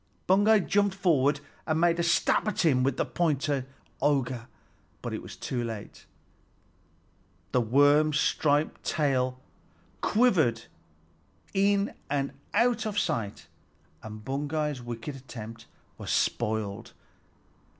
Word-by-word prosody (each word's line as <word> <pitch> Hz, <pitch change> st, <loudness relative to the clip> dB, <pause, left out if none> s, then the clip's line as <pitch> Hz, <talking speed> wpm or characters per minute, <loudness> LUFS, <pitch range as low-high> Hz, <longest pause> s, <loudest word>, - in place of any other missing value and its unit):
Baugi 205 Hz, +3 st, +5 dB
jumped 200 Hz, -1 st, +2 dB
forward 150 Hz, -7 st, +2 dB, 0.3 s
and 160 Hz, 0 st, +1 dB
made 170 Hz, 0 st, +3 dB
a -, -, +3 dB
stab 170 Hz, +5 st, +2 dB
at 205 Hz, -4 st, 0 dB
him 130 Hz, -5 st, +4 dB
with 130 Hz, 0 st, +1 dB
the -, -, +1 dB
pointed 145 Hz, -5 st, 0 dB, 0.3 s
auger, 130 Hz, -5 st, 0 dB, 0.6 s
but -, -, -4 dB
it -, -, -4 dB
was -, -, -10 dB
too 125 Hz, -2 st, -3 dB
late. 110 Hz, -3 st, -7 dB, 1.4 s
The 125 Hz, -, +3 dB
worm's 145 Hz, +5 st, +4 dB
striped 150 Hz, 0 st, +1 dB
tail 130 Hz, -4 st, 0 dB, 0.6 s
quivered 190 Hz, -, +3 dB, 0.9 s
in 200 Hz, +1 st, +2 dB, 0.6 s
out 235 Hz, -2 st, +2 dB
of 205 Hz, -1 st, -4 dB
sight, 115 Hz, -, -1 dB, 0.6 s
and 110 Hz, 0 st, -9 dB
Baugi's 145 Hz, 0 st, -2 dB
wicked 120 Hz, +3 st, -6 dB
attempt 115 Hz, -4 st, -9 dB, 0.3 s
was -, -, -6 dB
spoiled. 110 Hz, 0 st, -1 dB
145 Hz, 110 wpm, -28 LUFS, 120-175 Hz, 1.4 s, Baugi